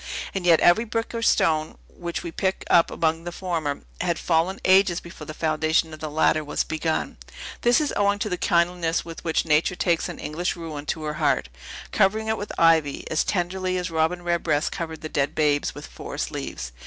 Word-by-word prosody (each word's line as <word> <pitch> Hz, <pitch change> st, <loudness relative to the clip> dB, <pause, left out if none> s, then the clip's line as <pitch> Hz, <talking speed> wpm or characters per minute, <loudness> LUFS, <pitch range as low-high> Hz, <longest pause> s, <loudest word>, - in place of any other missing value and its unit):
And 190 Hz, -2 st, -2 dB
yet 165 Hz, -2 st, +6 dB
every 175 Hz, +6 st, +5 dB
brick 225 Hz, 0 st, -3 dB
or 230 Hz, -, -3 dB
stone, 155 Hz, -8 st, +2 dB
which 170 Hz, -1 st, -6 dB
we 170 Hz, -, -5 dB
pick 190 Hz, +3 st, -1 dB
up 170 Hz, -, +6 dB
among 165 Hz, 0 st, 0 dB
the 175 Hz, -, -5 dB
former, 165 Hz, -6 st, -3 dB, 0.2 s
had 170 Hz, -2 st, 0 dB
fallen 175 Hz, +3 st, +1 dB
ages 185 Hz, -2 st, +5 dB
before 165 Hz, -3 st, -11 dB
the 155 Hz, -, -6 dB
foundation 160 Hz, 0 st, +1 dB
of 155 Hz, -, -9 dB
the 155 Hz, -, -4 dB
latter 155 Hz, 0 st, +2 dB
was 145 Hz, -, -1 dB
begun. 160 Hz, 0 st, -2 dB, 0.4 s
This 240 Hz, +4 st, +4 dB
is 300 Hz, -2 st, -1 dB
owing 200 Hz, 0 st, +2 dB
to 210 Hz, -, -2 dB
the 180 Hz, -, -1 dB
kindliness 170 Hz, -1 st, +1 dB
with 165 Hz, -1 st, -9 dB
which 160 Hz, -1 st, 0 dB
Natures 160 Hz, +3 st, +2 dB
takes 170 Hz, -2 st, +1 dB
an -, -, -7 dB
English 170 Hz, +4 st, -2 dB
ruin 155 Hz, -4 st, -7 dB
to 155 Hz, -, -2 dB
her 150 Hz, 0 st, -2 dB
heart, -, -, +2 dB, 0.4 s
covering 215 Hz, +2 st, +2 dB
it 220 Hz, -, +1 dB
with 205 Hz, -, -5 dB
ivy, 160 Hz, -4 st, +3 dB
as 160 Hz, -, +2 dB
tenderly 185 Hz, 0 st, -1 dB
as 180 Hz, -1 st, -3 dB
Robin 165 Hz, +2 st, 0 dB
Redbreast 170 Hz, -4 st, 0 dB
covered 160 Hz, -2 st, -5 dB
the 155 Hz, -, -4 dB
dead 140 Hz, -2 st, -1 dB
babes 145 Hz, -2 st, +1 dB
with -, -, -8 dB
forest 60 Hz, 0 st, -5 dB
leaves. -, -, -5 dB
170 Hz, 200 wpm, -24 LUFS, 155-180 Hz, 0.4 s, yet